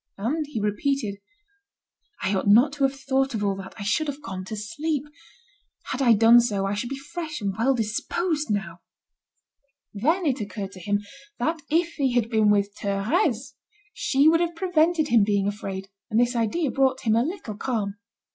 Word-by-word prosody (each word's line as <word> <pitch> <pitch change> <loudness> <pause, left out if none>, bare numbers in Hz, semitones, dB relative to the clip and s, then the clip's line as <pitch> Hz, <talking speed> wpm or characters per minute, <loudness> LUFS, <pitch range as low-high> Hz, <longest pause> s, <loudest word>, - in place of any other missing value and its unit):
And 285 +10 -1
he 290 -6 -4
repeated: 210 0 -1 1.0
"I 190 - +1
ought 190 +1 -1
not 240 +8 +6
to 285 -2 +1
have 270 0 -2
thought 270 -1 0
of 210 - -2
all 200 -1 +1
that, 190 -1 -9
I 205 - -6
should 305 +10 0
have 285 0 -4
gone 190 -10 -6
to 215 - -5
sleep. 290 +7 -2 0.9
Had 265 - -2
I 240 -3 +6
done 225 +2 +7
so, 205 -5 0
I 195 - -1
should 210 +4 -3
be 275 - -4
fresh 310 +2 -6
and 200 -3 -2
well 260 +5 +2
disposed 295 - -1
now." 195 -5 -2 1.1
Then 320 - +1
it 265 -5 0
occurred 200 -1 -5
to 190 - -11
him 205 +3 -1 0.4
that 320 0 -1
if 335 +2 +2
he 270 -4 +1
had 235 -1 +1
been 220 -2 +4
with 205 0 +2
Thérèse, 225 +6 0 0.4
she 290 - +2
would 330 +1 +5
have 340 0 -1
prevented 330 -3 +2
him 230 -3 +5
being 200 -1 +1
afraid, 195 -2 -4 0.2
and 220 - +2
this 245 +1 +2
idea 240 +6 0
brought 265 -1 +1
him 220 -2 +2
a 230 - +4
little 285 - -4
calm. 205 -3 -2
240 Hz, 185 wpm, -25 LUFS, 205-290 Hz, 1.1 s, done